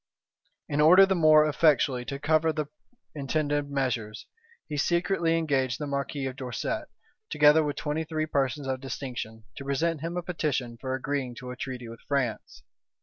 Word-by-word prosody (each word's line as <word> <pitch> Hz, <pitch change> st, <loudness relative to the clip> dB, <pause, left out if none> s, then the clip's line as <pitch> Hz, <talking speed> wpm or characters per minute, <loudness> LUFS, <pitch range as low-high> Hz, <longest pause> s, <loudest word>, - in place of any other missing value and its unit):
In 145 Hz, 0 st, 0 dB
order 180 Hz, +5 st, +8 dB
the 195 Hz, -, +1 dB
more 155 Hz, -3 st, +6 dB
effectually 140 Hz, -4 st, +2 dB
to 140 Hz, -, -4 dB
cover 155 Hz, +2 st, +2 dB
the 155 Hz, -1 st, -2 dB, 0.5 s
intended 145 Hz, 0 st, -1 dB
measures, 125 Hz, -6 st, -2 dB, 0.4 s
he 150 Hz, -, -4 dB
secretly 170 Hz, +2 st, +1 dB
engaged 135 Hz, -6 st, 0 dB
the 150 Hz, -, -4 dB
marquis 140 Hz, 0 st, -3 dB
of 130 Hz, -1 st, -4 dB
Dorset, 130 Hz, -3 st, -3 dB, 0.4 s
together 150 Hz, +1 st, +5 dB
with 145 Hz, -1 st, -2 dB
twenty 150 Hz, +1 st, -2 dB
three 155 Hz, -1 st, -2 dB
persons 140 Hz, -1 st, -1 dB
of 130 Hz, -1 st, -2 dB
distinction, 120 Hz, -5 st, -6 dB
to 140 Hz, -, -6 dB
present 150 Hz, +3 st, -1 dB
him 170 Hz, +2 st, -3 dB
a 175 Hz, -, -2 dB
petition 145 Hz, -9 st, -2 dB
for 130 Hz, -1 st, -2 dB
agreeing 130 Hz, -2 st, -3 dB
to 125 Hz, +1 st, -7 dB
a -, -, -6 dB
treaty 125 Hz, -1 st, -6 dB
with 115 Hz, 0 st, -10 dB
France. 130 Hz, -, -2 dB
145 Hz, 165 wpm, -27 LUFS, 130-155 Hz, 0.5 s, order